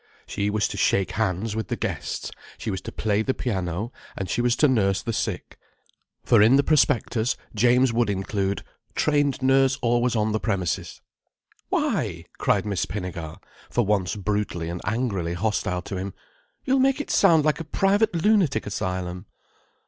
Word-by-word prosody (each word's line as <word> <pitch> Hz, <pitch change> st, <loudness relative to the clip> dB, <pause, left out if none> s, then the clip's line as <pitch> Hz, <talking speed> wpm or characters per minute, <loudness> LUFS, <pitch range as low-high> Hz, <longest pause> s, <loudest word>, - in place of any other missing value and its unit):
She 100 Hz, 0 st, -2 dB
was 105 Hz, 0 st, +1 dB
to -, -, -6 dB
shake 95 Hz, -2 st, +2 dB
hands 105 Hz, +1 st, -1 dB
with 110 Hz, -, -3 dB
the -, -, -2 dB
guests: -, -, -4 dB, 0.3 s
she 110 Hz, -, -4 dB
was 95 Hz, -, -3 dB
to -, -, -7 dB
play 105 Hz, -1 st, 0 dB
the 130 Hz, +4 st, -1 dB
piano, 95 Hz, -1 st, -2 dB, 0.3 s
and 95 Hz, -, -3 dB
she 120 Hz, -, 0 dB
was 120 Hz, 0 st, +2 dB
to 150 Hz, -, +4 dB
nurse 100 Hz, -7 st, +2 dB
the 115 Hz, -, -2 dB
sick. -, -, -3 dB, 0.6 s
For 115 Hz, -4 st, +5 dB
in 115 Hz, +5 st, +6 dB
the 140 Hz, -, +4 dB
prospectus 130 Hz, -5 st, +2 dB, 0.2 s
James 120 Hz, +2 st, +3 dB
would 115 Hz, -1 st, +2 dB
include: 100 Hz, 0 st, -1 dB, 0.3 s
"Trained 145 Hz, -3 st, +1 dB
nurse 135 Hz, 0 st, +4 dB
always 120 Hz, 0 st, +1 dB
on 110 Hz, 0 st, +1 dB
the 110 Hz, -, 0 dB
premises." 95 Hz, -2 st, -2 dB, 0.7 s
"Why!" -, -, -1 dB
cried -, -, +2 dB
Miss 100 Hz, -3 st, -1 dB
Pinnegar, 85 Hz, -5 st, -5 dB, 0.3 s
for 120 Hz, -, +1 dB
once 100 Hz, -2 st, 0 dB
brutally 100 Hz, -5 st, -2 dB
and 85 Hz, +1 st, -5 dB
angrily 100 Hz, -8 st, -1 dB
hostile 90 Hz, -2 st, -1 dB
to 95 Hz, -, -5 dB
him: 95 Hz, +1 st, -5 dB, 0.5 s
"You'll 265 Hz, 0 st, +3 dB
make 270 Hz, +2 st, +3 dB
it 290 Hz, -, -4 dB
sound 160 Hz, -3 st, +5 dB
like 155 Hz, +1 st, +2 dB
a -, -, -3 dB
private 200 Hz, +6 st, +1 dB
lunatic 190 Hz, -, +3 dB
asylum." 90 Hz, -2 st, -4 dB
110 Hz, 165 wpm, -24 LUFS, 95-130 Hz, 0.7 s, in